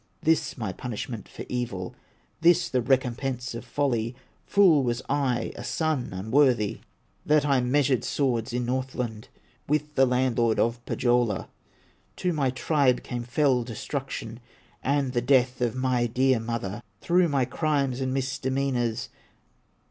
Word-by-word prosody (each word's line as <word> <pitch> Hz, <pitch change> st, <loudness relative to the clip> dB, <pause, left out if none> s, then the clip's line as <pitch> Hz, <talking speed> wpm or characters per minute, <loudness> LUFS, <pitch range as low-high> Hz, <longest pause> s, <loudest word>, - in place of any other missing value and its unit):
This 160 Hz, -1 st, +1 dB
my 110 Hz, -6 st, -3 dB
punishment 115 Hz, -2 st, -6 dB
for -, -, -8 dB
evil, 115 Hz, -7 st, -3 dB, 0.5 s
This 170 Hz, +1 st, +4 dB
the 130 Hz, -3 st, +1 dB
recompense 125 Hz, 0 st, 0 dB
of 115 Hz, -, -6 dB
folly! 125 Hz, -5 st, -1 dB, 0.3 s
Fool 180 Hz, -8 st, +5 dB
was 120 Hz, -2 st, -1 dB
I, 135 Hz, -4 st, 0 dB
a 120 Hz, -, -7 dB
son 155 Hz, -1 st, -1 dB
unworthy, 110 Hz, +3 st, +2 dB, 0.4 s
That 150 Hz, -1 st, +3 dB
I 135 Hz, -3 st, +3 dB
measured 130 Hz, 0 st, +2 dB
swords 120 Hz, -6 st, 0 dB
in 125 Hz, 0 st, -1 dB
Northland 125 Hz, -3 st, -3 dB, 0.4 s
With 150 Hz, 0 st, 0 dB
the 135 Hz, -2 st, +4 dB
landlord 125 Hz, -3 st, +2 dB
of 120 Hz, +1 st, 0 dB
Pohyola. 120 Hz, -5 st, +1 dB, 0.7 s
To 180 Hz, -1 st, -1 dB
my 140 Hz, -4 st, +1 dB
tribe 130 Hz, 0 st, +1 dB
came 120 Hz, -1 st, -4 dB
fell 125 Hz, 0 st, +2 dB
destruction, 115 Hz, -1 st, -5 dB, 0.4 s
And 140 Hz, -2 st, 0 dB
the 120 Hz, -, +1 dB
death 125 Hz, -1 st, +2 dB
of 120 Hz, -1 st, 0 dB
my 130 Hz, -2 st, +1 dB
dear 130 Hz, +1 st, +2 dB
mother, 115 Hz, -2 st, -4 dB, 0.2 s
Through 175 Hz, +4 st, +3 dB
my 135 Hz, -3 st, +2 dB
crimes 135 Hz, -1 st, 0 dB
and 130 Hz, -1 st, -1 dB
misdemeanors." 130 Hz, -3 st, -1 dB
125 Hz, 135 wpm, -26 LUFS, 120-140 Hz, 0.7 s, Fool